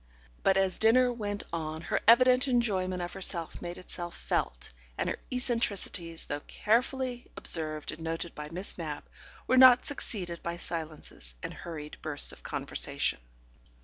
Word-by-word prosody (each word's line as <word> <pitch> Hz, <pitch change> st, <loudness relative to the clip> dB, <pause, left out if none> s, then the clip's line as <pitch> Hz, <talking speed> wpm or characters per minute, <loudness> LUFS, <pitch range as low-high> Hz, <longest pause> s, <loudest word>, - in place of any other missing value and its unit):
But 195 Hz, 0 st, +3 dB
as 190 Hz, -1 st, +1 dB
dinner 245 Hz, +3 st, +4 dB
went 205 Hz, -3 st, -4 dB
on 160 Hz, -1 st, -4 dB
her -, -, -1 dB
evident 255 Hz, +3 st, +6 dB
enjoyment 190 Hz, -8 st, 0 dB
of 175 Hz, -, -6 dB
herself 180 Hz, -4 st, -3 dB
made 175 Hz, 0 st, -6 dB
itself 175 Hz, -1 st, -7 dB
felt, -, -, -2 dB, 0.2 s
and -, -, -1 dB
her -, -, -3 dB
eccentricities, 205 Hz, -9 st, 0 dB
though 145 Hz, -, -3 dB
carefully 245 Hz, +3 st, -1 dB
observed 155 Hz, -2 st, +1 dB
and 155 Hz, -, -10 dB
noted 165 Hz, +1 st, -4 dB
by 150 Hz, 0 st, -7 dB
Miss 180 Hz, +3 st, +4 dB
Mapp, 155 Hz, -3 st, -5 dB, 0.4 s
were 255 Hz, -, +2 dB
not 255 Hz, -1 st, +8 dB
succeeded 180 Hz, -11 st, -1 dB
by 170 Hz, 0 st, -4 dB
silences 155 Hz, -, -6 dB
and -, -, -5 dB
hurried 155 Hz, -3 st, -8 dB
bursts 150 Hz, -2 st, +2 dB
of -, -, -13 dB
conversation. -, -, -1 dB
180 Hz, 145 wpm, -29 LUFS, 165-235 Hz, 0.4 s, not